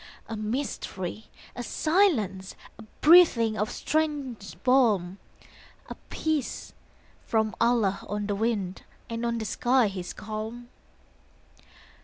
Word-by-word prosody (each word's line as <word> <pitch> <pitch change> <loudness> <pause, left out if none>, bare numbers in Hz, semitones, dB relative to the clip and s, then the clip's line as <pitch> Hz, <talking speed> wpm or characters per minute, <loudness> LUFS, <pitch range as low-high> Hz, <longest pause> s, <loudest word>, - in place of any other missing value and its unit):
A 225 - -5
mystery, 215 -4 -4 0.3
a 245 - -4
silence, 240 - +1 0.2
A - - -8 0.2
breathing 300 -10 +6
of 210 0 -1
strange 275 - -2
balm, 210 -8 +3 0.7
A - - -5
peace 310 -5 -2 0.5
from 220 -1 +1
Allah 225 -5 +2
on 205 0 -2
the 205 - -1
wind 200 -3 -1 0.3
And 230 +1 -3
on 235 0 -1
the 220 - -3
sky 245 +1 +2
his 185 -2 -6
calm. 220 +3 -6
225 Hz, 110 wpm, -27 LUFS, 205-255 Hz, 0.7 s, breathing